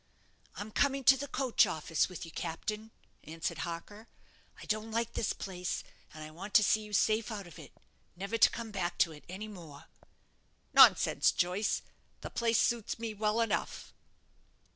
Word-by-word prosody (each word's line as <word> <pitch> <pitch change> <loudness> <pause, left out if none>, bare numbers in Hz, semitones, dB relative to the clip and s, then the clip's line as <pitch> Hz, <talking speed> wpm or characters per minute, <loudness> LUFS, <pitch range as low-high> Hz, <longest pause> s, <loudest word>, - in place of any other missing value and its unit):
"I'm 210 +1 -7
coming 275 +3 +1
to 270 - +8
the 280 +2 -5
coach 265 -3 +2
office 160 +2 -1
with 180 -2 -7
you, 165 - -11
captain," 210 +8 -4 0.3
answered 165 +1 -4
Harker. 195 +6 -6 0.5
"I - - -10
don't 215 +1 -2
like 230 +1 -2
this 215 - -1
place, 180 -2 -4 0.3
and 155 0 -9
I 155 - -9
want 195 +6 -9
to 215 - +8
see 215 +2 +3
you 210 0 -10
safe 215 +2 +2
out 205 -3 -5
of 170 -3 -13
it, - - -12 0.4
never 195 +5 -4
to - - +7
come 230 -2 -6
back 180 -3 -3
to 165 - -12
it 150 -1 -12
any 195 +4 -6
more." 165 -9 -11 0.9
"Nonsense, - - +6
Joyce; 185 +4 0 0.4
the - - -7
place 230 -1 +1
suits 235 -3 0
me 225 -1 -4
well 215 +2 0
enough." 220 -2 -2
210 Hz, 170 wpm, -32 LUFS, 175-225 Hz, 0.9 s, to